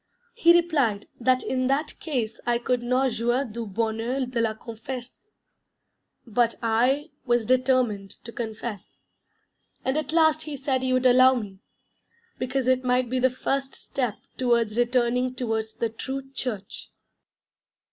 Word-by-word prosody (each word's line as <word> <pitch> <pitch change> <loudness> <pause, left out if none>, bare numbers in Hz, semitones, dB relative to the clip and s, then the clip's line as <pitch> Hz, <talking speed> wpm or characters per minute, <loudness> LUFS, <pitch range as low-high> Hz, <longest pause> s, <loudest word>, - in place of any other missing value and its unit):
He 340 - +5
replied 300 -12 +2
that 255 +1 +2
in 255 -1 0
that 280 +3 -1
case 240 -8 -2
I 240 -1 +3
could 245 +1 0
not 255 +2 +1
"jouir 240 +4 0
du 230 -1 -6
bonheur 225 +5 -1
de 245 -2 -2
la 220 -1 0
confesse," 245 - -8 1.0
but 235 0 +1
I 250 +7 +1 0.2
was 240 -2 +2
determined 250 -5 +2
to 230 - -7
confess, 220 -2 -6 0.8
and 265 - +1
at 310 - -4
last 315 -1 +4
he 300 -2 -5
said 270 -1 0
he 260 0 0
would 255 0 +2
allow 255 +1 +7
me, 200 -5 -5 0.8
because 255 0 -1
it 255 0 +3
might 250 -1 +1
be 260 - +1
the 260 +1 +4
first 270 +2 -2
step 245 -6 -3 0.2
towards 235 -4 +2
returning 250 +1 +1
towards 220 -3 -2
the 230 - -1
true 265 +4 -6
Church. 220 -7 -5
250 Hz, 145 wpm, -25 LUFS, 230-260 Hz, 1.0 s, allow